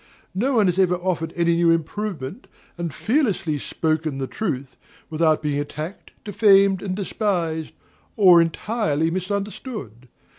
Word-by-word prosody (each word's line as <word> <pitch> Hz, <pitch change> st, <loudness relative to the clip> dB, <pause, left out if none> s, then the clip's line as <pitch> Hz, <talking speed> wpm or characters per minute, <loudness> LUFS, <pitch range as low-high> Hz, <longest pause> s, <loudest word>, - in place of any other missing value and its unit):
No 250 Hz, +8 st, 0 dB
one 215 Hz, -3 st, +4 dB
has 180 Hz, 0 st, +1 dB
ever 180 Hz, -2 st, +3 dB
offered 175 Hz, -2 st, -2 dB
any 170 Hz, -1 st, +2 dB
new 170 Hz, 0 st, +3 dB
improvement, 165 Hz, -, -2 dB, 0.3 s
and 170 Hz, -2 st, -4 dB
fearlessly 210 Hz, -, 0 dB
spoken 155 Hz, -1 st, -1 dB
the 135 Hz, -, -2 dB
truth, 135 Hz, -6 st, -4 dB, 0.4 s
without 155 Hz, 0 st, +2 dB
being 145 Hz, -1 st, 0 dB
attacked, 155 Hz, +5 st, -6 dB
defamed, 200 Hz, -2 st, +4 dB
and 185 Hz, -2 st, -3 dB
despised, 180 Hz, -6 st, -2 dB, 0.4 s
or 180 Hz, -5 st, +7 dB
entirely 165 Hz, -2 st, 0 dB
misunderstood. 190 Hz, -, -5 dB
175 Hz, 125 wpm, -23 LUFS, 155-200 Hz, 0.4 s, or